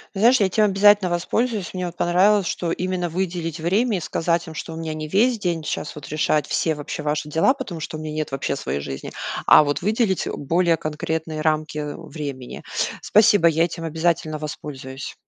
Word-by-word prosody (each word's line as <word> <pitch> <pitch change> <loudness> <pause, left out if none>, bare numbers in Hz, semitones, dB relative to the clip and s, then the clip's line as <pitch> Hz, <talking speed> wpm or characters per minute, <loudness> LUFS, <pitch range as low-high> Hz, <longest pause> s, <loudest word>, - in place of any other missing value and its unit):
Знаешь, 235 +6 +5
я 205 - +4
этим 210 +3 +3
обязательно 205 -1 +5
воспользуюсь. 205 +4 -1
Мне 180 -2 -3
понравилось, 185 +4 +3
что 170 0 -2
именно 180 0 -2
выделить 170 -2 -3
время 200 +7 +1
и - - -2
сказать 170 +1 -1
им, 160 - -9
что 160 +1 -6
у - - -7
меня 160 -1 -4
не 155 0 -5
весь 225 +8 +2
день 170 -4 -1
сейчас 150 - -4
вот 150 -2 -9
решать 150 -1 +1
все 160 +1 0
вообще 150 +2 -5
ваши 150 0 -2
дела, 165 - +3
потому 210 - -6
что 155 0 -5
у - - -8
меня 155 -1 -5
нет 155 -1 -3
вообще 135 0 -2
своей 70 - -3
жизни. 70 -1 -6 0.4
А - - +9
вот 145 -1 -1
выделить 210 0 +1
более 165 +3 +1
конкретные 155 +1 -3
рамки 155 -1 0 0.2
времени. 145 -6 -7 0.4
Спасибо. 210 -4 +5
Я 165 0 +3
этим 165 -1 -6
обязательно 160 -1 0
воспользуюсь. 135 -3 -7
165 Hz, 185 wpm, -22 LUFS, 155-190 Hz, 0.4 s, А